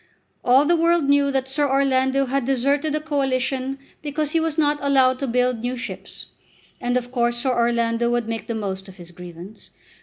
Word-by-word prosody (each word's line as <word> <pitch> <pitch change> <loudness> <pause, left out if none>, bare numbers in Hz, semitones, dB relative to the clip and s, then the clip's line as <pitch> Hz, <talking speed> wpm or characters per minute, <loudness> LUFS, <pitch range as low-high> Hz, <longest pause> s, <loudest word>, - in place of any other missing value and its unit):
All 260 +4 +5
the 345 +3 +3
world 335 0 +3
knew 280 0 +3
that 265 -1 -1
Sir 285 +1 0
Orlando 270 0 +2
had 270 +1 -1
deserted 275 +4 +1
the 305 - 0
Coalition 270 -3 -1 0.2
because 300 0 -2
he 330 - +2
was 320 -1 -2
not 295 -1 +2
allowed 265 -2 +3
to 275 - -2
build 250 0 +1
new 245 +2 -3
ships, 245 - -7 0.5
and 245 +1 0
of 245 0 -4
course 240 -1 0
Sir 255 +2 +1
Orlando 235 -1 +1
would 240 -1 0
make 225 -1 -4
the 230 - -3
most 195 -2 -4
of 190 - -14
his 175 -1 -12
grievance. 180 +3 -12
260 Hz, 190 wpm, -22 LUFS, 235-280 Hz, 0.5 s, All